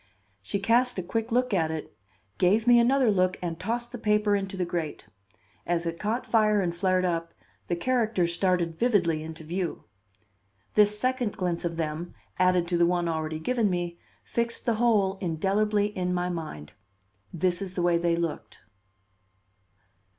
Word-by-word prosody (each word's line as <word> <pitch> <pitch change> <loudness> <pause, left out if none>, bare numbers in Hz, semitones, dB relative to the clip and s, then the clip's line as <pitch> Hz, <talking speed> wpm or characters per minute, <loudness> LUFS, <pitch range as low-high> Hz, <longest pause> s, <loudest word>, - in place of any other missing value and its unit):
She 100 - -3
cast 235 +5 +2
a 185 - -2
quick 225 +6 -3
look 250 -1 +1
at 165 -4 +2
it, 160 -1 -6 0.4
gave 205 +5 +3
me 240 -1 +7
another 250 0 +4
look 185 -2 +1
and 170 -2 -4
tossed 235 +5 -3
the 245 - -7
paper 210 -1 +2
into 195 -1 -3
the 180 - 0
grate. 170 -3 -4 0.6
As 170 -1 -1
it 165 0 -3
caught 225 +4 -2
fire 215 -2 +3
and 175 -3 -1
flared 185 0 +1
up, 165 -1 -2 0.3
the 175 - 0
characters 215 -4 +1
started 175 -3 0
vividly 180 -10 +2
into 160 +1 -8
view. 175 +2 -3 0.9
This 210 0 +4
second 250 -1 -1
glimpse 175 -2 -1
of 165 -1 -3
them, 160 +2 -4 0.2
added 180 -1 +3
to 175 -1 +1
the 170 - +5
one 175 -1 0
already 160 -1 -2
given 225 +6 0
me, 175 -1 -3 0.2
fixed 235 0 -2
the 235 - +2
whole 205 -5 +3
indelibly 205 +4 0
in 180 -1 -1
my 180 0 -1
mind. 155 - -6 0.6
This 175 +2 0
is 190 -2 -5
the 175 - -1
way 175 -1 +3
they 170 0 +1
looked. 170 -2 -4
185 Hz, 165 wpm, -27 LUFS, 170-215 Hz, 0.9 s, me